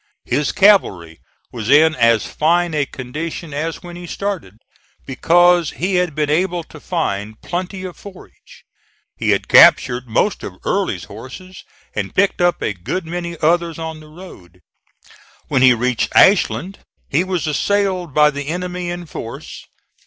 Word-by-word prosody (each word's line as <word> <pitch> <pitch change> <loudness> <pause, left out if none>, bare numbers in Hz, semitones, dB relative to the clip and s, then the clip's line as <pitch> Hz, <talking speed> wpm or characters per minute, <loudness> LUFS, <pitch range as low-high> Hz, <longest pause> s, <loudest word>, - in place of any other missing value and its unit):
His 145 -1 0
cavalry 95 - +3 0.3
was 115 -2 -5
in 155 +3 +6
as 115 -4 +2
fine 170 +2 +1
a 145 -2 0
condition 155 +5 -6
as 160 +4 -4
when 175 -1 -9
he 175 0 -9
started, 185 - -5 0.5
because 175 +4 +3
he 185 +3 -1
had 180 -5 0
been 150 -1 0
able 175 +2 0
to 155 - -14
find 110 - -3
plenty 185 +2 -4
of 185 -2 -7
forage. 195 -3 -15 0.5
He - - -2
had - - +1
captured 125 +1 +5
most 110 - 0
of - - -7
Early's - - -1
horses 135 - -11 0.3
and 100 -2 -4
picked 200 -1 +1
up 175 0 +1
a 105 - -1
good 100 - -4
many 170 0 -5
others 170 0 +1
on 160 -1 -6
the 155 - -14
road. 125 - -14 0.9
When 130 - +1
he 130 -1 +6
reached 125 0 -1
Ashland 195 -1 +3 0.3
he 155 +6 +1
was 185 -3 -2
assailed 185 +2 0
by 150 +2 +4
the 145 -1 -6
enemy 180 +1 -4
in 175 0 -5
force. 115 -7 -9
165 Hz, 155 wpm, -18 LUFS, 130-180 Hz, 0.9 s, in